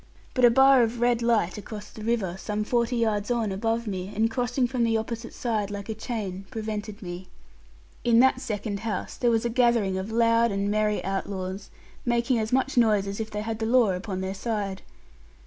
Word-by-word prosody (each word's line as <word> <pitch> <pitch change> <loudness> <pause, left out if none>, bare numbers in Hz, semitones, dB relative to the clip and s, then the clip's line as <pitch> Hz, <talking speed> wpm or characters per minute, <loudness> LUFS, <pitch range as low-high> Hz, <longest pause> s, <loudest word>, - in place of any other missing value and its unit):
But 255 -2 +4
a - - +8
bar 265 +2 +6
of 235 0 0
red 240 0 +2
light 220 -5 +1
across 210 0 -8
the 215 - -10
river, 215 -6 0
some 210 +2 -3
forty 235 +2 0
yards 215 -3 0
on 230 -4 0
above 225 +4 -1
me, 190 -2 -4
and 225 +2 +2
crossing 245 +2 0
from 245 0 -1
the 225 -1 +2
opposite 230 +1 -5
side 215 -4 -2
like 205 +1 -6
a - - -1
chain, 205 -4 -5
prevented 215 -1 -5
me. 180 +1 -7 0.8
In 235 -1 +4
that 265 +1 +4
second 210 -4 -3
house 215 -3 -4
there 240 - +1
was 225 0 +1
a - - +1
gathering 230 -6 +2
of 195 +4 -5
loud 230 0 +3
and 200 +1 -1
merry 210 0 0
outlaws, 195 0 -4 0.3
making 240 0 +1
as 220 0 -2
much 265 +1 +1
noise 215 -4 +4
as 200 +1 -5
if 220 0 -3
they 210 -1 -4
had 220 0 -4
the 220 - -1
law 235 -4 +4
upon 185 +1 -4
their 190 0 -3
side. 200 -2 -3
220 Hz, 200 wpm, -26 LUFS, 200-235 Hz, 0.8 s, a